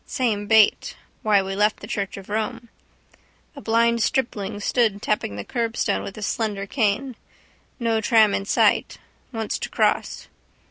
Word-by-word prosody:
Same 215 -5 -1
bait. 220 -1 +4 0.3
Why 205 -2 +3
we 195 0 -4
left 210 +2 +1
the - - -9
church 200 -1 -4
of 195 - -10
Rome. 225 +3 -3 0.9
A 280 - -9
blind 230 0 +2
stripling 215 -5 -1
stood 215 -1 +1
tapping 205 - -2
the 100 - -6
curbstone 230 -3 -1
with 195 - -7
his 215 - -4
slender 210 -4 -2
cane. 235 +3 -1 0.6
No 230 -2 0
tram 220 -2 +4
in 195 - -1
sight. - - +2 0.3
Wants 225 -3 -3
to - - -4
cross. - - 0
215 Hz, 150 wpm, -23 LUFS, 205-230 Hz, 0.9 s, bait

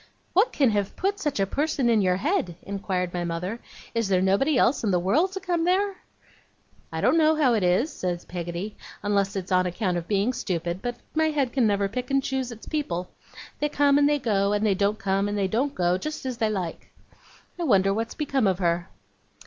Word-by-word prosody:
'What 395 +7 +4
can 270 -5 +3
have 205 -1 -1
put 400 +2 -1
such 295 - -2
a 195 - +3
person 280 +3 0
in 225 -3 +4
your 185 -1 +2
head?' 195 - -1
inquired 190 -3 -3
my 175 -1 -2
mother. 175 +6 -3 0.3
'Is 230 -2 0
there 190 -2 +3
nobody 200 +10 +2
else 245 +2 +3
in 215 - +1
the 180 - +3
world 260 - +2
to 385 - -3
come 355 -3 -1
there?' 390 +3 +2 1.0
'I - - -3
don't - - +4
know 315 0 +4
how 280 -6 +3
it 220 - +2
is,' 185 - +2
said 175 -1 -3
Peggotty, 175 +3 -5 0.3
'unless 200 -1 +1
it's 190 -1 -4
on 185 0 +3
account 180 0 -1
of 170 0 -5
being 205 +4 +1
stupid, 175 -3 -3
but 245 -1 -3 0.2
my 315 0 +2
head 275 -5 -1
never 205 -6 +2
can 195 - -16
pick 250 +1 -3
and 275 0 +2
choose 265 -2 -2
its 225 -1 -10
people. 185 - -3 0.5
They 295 - 0
come 285 -1 +3
and 290 0 +4
they 295 - +3
go, 205 -6 +1
and 210 +1 +1
they 205 - +3
don't 200 +2 +1
come 195 0 0
and 205 - -2
they 195 -1 +1
don't 265 +8 -1
go, 180 +1 +1
just 305 +4 -5
as 255 -2 -3
they 220 -2 +2
like. 185 -6 -4 0.7
I - - -1
wonder 195 - +3
what's 225 +2 -3
become 270 -7 +1
of 190 -2 +1
her? 175 -1 0
210 Hz, 220 wpm, -25 LUFS, 185-280 Hz, 1.0 s, What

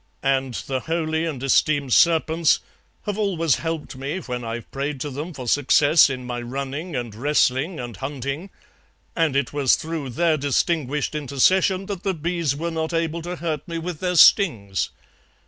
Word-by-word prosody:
And 135 -2 0
the 130 -1 -2
holy 160 +1 -1
and 140 -6 -4
esteemed 140 -1 +2
serpents 165 -1 +4 0.5
have 205 0 -3
always 170 -7 +1
helped 160 -4 -4
me 135 +6 -4
when 125 -9 -5
I've 115 0 -6
prayed 140 +1 -3
to 145 - -3
them 150 +6 -5
for 130 -6 -8
success 145 +4 +5
in 130 -2 -5
my 120 -1 -4
running 140 +6 -5
and 120 -3 -4
wrestling 145 - +1
and 120 -3 -6
hunting, 140 - -5 0.7
and 160 -5 +1
it 140 -1 0
was 140 -3 +3
through 160 -4 -5
their 160 +5 +1
distinguished 145 0 0
intercession 185 +7 +2
that 195 -3 -5
the 195 -2 -1
bees 165 -3 -1
were 170 +3 -3
not 160 +1 -3
able 165 0 -1
to 175 +2 -5
hurt 160 -4 -4
me 170 -1 -4
with 165 -1 -5
their 180 -1 -1
stings. 115 - +4
150 Hz, 165 wpm, -23 LUFS, 135-165 Hz, 0.7 s, success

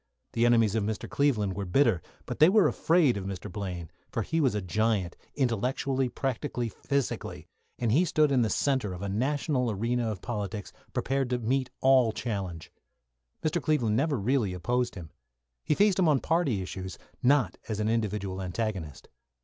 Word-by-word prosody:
The 115 +1 +3
enemies 115 -4 +4
of 110 -2 +1
Mr. 105 +1 -3
Cleveland 115 -9 +1
were 100 - -3
bitter, 110 - +3 0.2
but - - -5
they 155 +3 +8
were 205 0 +5
afraid 160 -9 +3
of 95 - -5
Mr. 95 -2 -5
Blaine; 90 -4 -5 0.2
for - - -1
he 165 0 0
was 130 -7 +2
a - - +1
giant 100 -1 0 0.2
intellectually, 130 +1 0
practically, 125 -2 -2
physically, 140 +4 -3 0.3
and 120 -3 0
he 155 +10 +4
stood 155 -4 +2
in 130 -2 +3
the 110 - +2
centre 130 -3 0
of 90 +2 -7
a 100 - -2
national 130 - 0
arena 115 +3 0
of 105 -4 -4
politics, 105 -3 -4 0.2
prepared 135 -1 -1
to 125 - +1
meet 125 +2 0
all 130 -3 +5
challenge. 95 -10 -4 0.7
Mr. 155 +2 0
Cleveland 130 -9 +1
never 140 +3 +1
really 110 -2 +1
opposed 120 +7 -1
him. 85 -5 -9 0.5
He 150 - +1
faced 200 0 +3
him 180 - +4
on 145 -3 +4
party 145 - +1
issues, 95 -1 -6 0.2
not 135 +1 +3
as 110 -1 -2
an 105 - 0
individual 105 -4 -1
antagonist. 95 -5 -4
115 Hz, 175 wpm, -28 LUFS, 100-135 Hz, 0.7 s, they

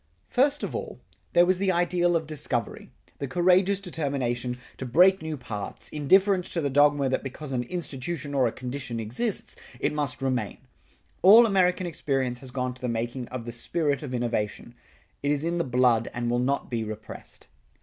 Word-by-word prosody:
First 285 +3 +1
of - - -3
all, - - -5 0.3
there 175 - +6
was 185 0 +2
the 195 -1 +2
ideal 175 0 +2
of 160 -1 0
discovery, 145 -7 -3 0.3
the 140 - -3
courageous 185 +5 +3
determination 135 -9 -2 0.2
to 130 - -5
break 185 +9 +5
new 160 -1 -4
paths, 105 -5 -6
indifference 185 +5 +3
to 170 - 0
the 140 -2 -1
dogma 145 0 +4
that 130 - 0
because 135 +2 -7
an 125 - 0
institution 145 0 -5
or 130 -3 +3
a - - -1
condition 125 -1 -5
exists, 125 - -2 0.2
it - - 0
must 145 -2 -3
remain. 125 -6 -1 0.6
All 220 +6 +9
American 185 -3 +2
experience 135 -6 -1
has 130 -1 -10
gone 125 0 -2
to 125 - -16
the 125 - -2
making 120 +2 -3
of 125 -2 -6
the 120 - -5
spirit 145 +3 -1
of 145 -4 -6
innovation; 120 -1 -2 0.5
it 145 - -1
is 145 +1 0
in 170 +1 -1
the - - +2
blood 125 -3 +2
and 120 0 -1
will 120 - +1
not 135 +2 -1
be 115 -2 -1
repressed. 110 -1 -8
140 Hz, 180 wpm, -26 LUFS, 125-175 Hz, 0.6 s, All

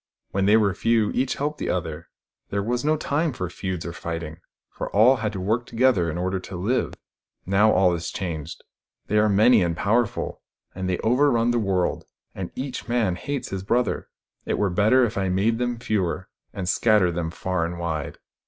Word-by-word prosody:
" - - -53
When 95 0 +1
they 105 +2 +6
were 100 -3 +2
few, 115 +1 +2
each 130 +1 0
helped 150 +2 -3
the - - -2
other: 80 -4 -3 0.4
there 100 0 -1
was 120 +4 -1
no 155 +1 +2
time 150 +1 0
for 90 -6 -3
feuds 95 -2 -4
or 85 - -5
fighting, 85 -1 -5 0.3
for - - -5
all 120 +6 +5
had 110 -3 -2
to 95 - -4
work 110 +6 -1
together 115 -8 +2
in 80 - -3
order 95 +2 -1
to 90 0 -9
live. 105 +9 -1 0.5
Now 100 +3 +4
all 95 -1 +4
is 85 0 -3
changed. 80 -4 -5 0.4
They 105 - +2
are 105 0 +3
many 110 +3 +5
and 85 -1 0
powerful, 115 +2 0 0.3
and 95 0 -3
they 90 - 0
over 125 +6 +4
run 120 -2 +2
the 120 - +1
world, 95 -4 0 0.3
and 95 -2 -5
each 130 -1 -5
man 115 -7 +1
hates 140 +9 -4
his 95 -1 -4
brother. 120 +5 0 0.3
It - - -1
were 100 -3 +1
better 110 +8 +4
if 110 -3 -3
I 95 -1 0
made 105 +5 +1
them 120 -1 -1
fewer, 95 -5 -2 0.2
and 95 -2 -5
scattered 100 -2 +3
them 85 -1 -2
far 95 +1 -2
and 85 +1 -3
wide. 80 -4 -3
100 Hz, 200 wpm, -24 LUFS, 90-120 Hz, 0.5 s, they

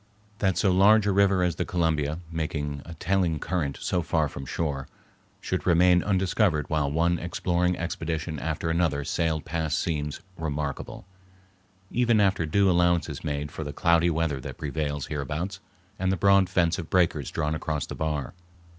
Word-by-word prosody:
That 95 -3 +1
so 100 - +3
large 100 +3 +5
a 100 - +2
river 100 -1 +3
as 85 -1 0
the - - 0
Columbia, 80 -2 0
making 75 -3 -3
a 85 - -9
telling 90 -1 0
current 75 -4 -2
so 90 - 0
far 80 -2 +1
from 65 -1 -8
shore, 70 -4 -2 0.5
should - - -3
remain 90 +1 +5
undiscovered 95 -5 +1
while 75 -3 +1
one 85 +2 +1
exploring 90 +1 0
expedition 80 -2 -3
after 80 +2 -2
another 80 -4 +1
sailed 80 +2 -1
past 80 -1 -1
seems 75 -3 -2 0.2
remarkable, 75 -1 -4 0.9
even 120 -2 +3
after 95 -5 +2
due 100 +5 +3
allowance 85 -2 +3
is 75 - -7
made 75 -2 -3
for 80 - -5
the 75 -1 -6
cloudy 85 +2 +3
weather 80 -4 -1
that - - -7
prevails 75 -1 -3
hereabouts 75 +6 -4 0.4
and 95 0 +1
the 95 - 0
broad 100 0 +4
fence 85 -1 +1
of 80 - -6
breakers 80 -6 +2
drawn 75 -1 -1
across 75 -2 -2
the - - -7
bar. 75 -4 -3
80 Hz, 165 wpm, -26 LUFS, 75-90 Hz, 0.9 s, large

